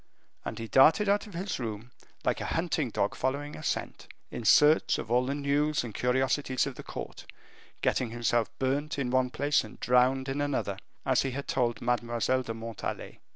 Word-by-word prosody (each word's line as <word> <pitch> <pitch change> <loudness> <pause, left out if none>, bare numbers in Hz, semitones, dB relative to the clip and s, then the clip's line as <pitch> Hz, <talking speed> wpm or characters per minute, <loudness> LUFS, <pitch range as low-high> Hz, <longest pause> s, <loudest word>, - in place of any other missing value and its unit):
And - - -5
he 115 - -5
darted 160 - +5
out 205 +2 +2
of 200 - -11
his 185 -1 -3
room, 115 0 -5 0.3
like - - +1
a - - -3
hunting 165 -5 0
dog 100 -2 0
following 145 +3 -2
a - - -8
scent, - - -3 0.2
in 115 - -6
search 150 +7 +5
of 110 - -6
all 125 +1 +3
the 140 - -1
news 145 +1 +1
and 115 -3 -7
curiosities 130 +2 +1
of 140 - -4
the - - -9
court, - - -8 0.5
getting 125 - +1
himself 120 -1 0
burnt 140 +3 -1
in 130 -3 -1
one 130 0 +2
place 145 +3 +1
and 110 - -12
drowned 130 +2 +3
in 135 +2 -2
another, 135 -9 -1 0.3
as 130 -2 +3
he 135 - -1
had 140 +2 -5
told 120 -3 0
Mademoiselle 120 +1 +1
de 115 -3 -5
Montalais. 115 -1 -6
130 Hz, 190 wpm, -29 LUFS, 120-145 Hz, 0.5 s, darted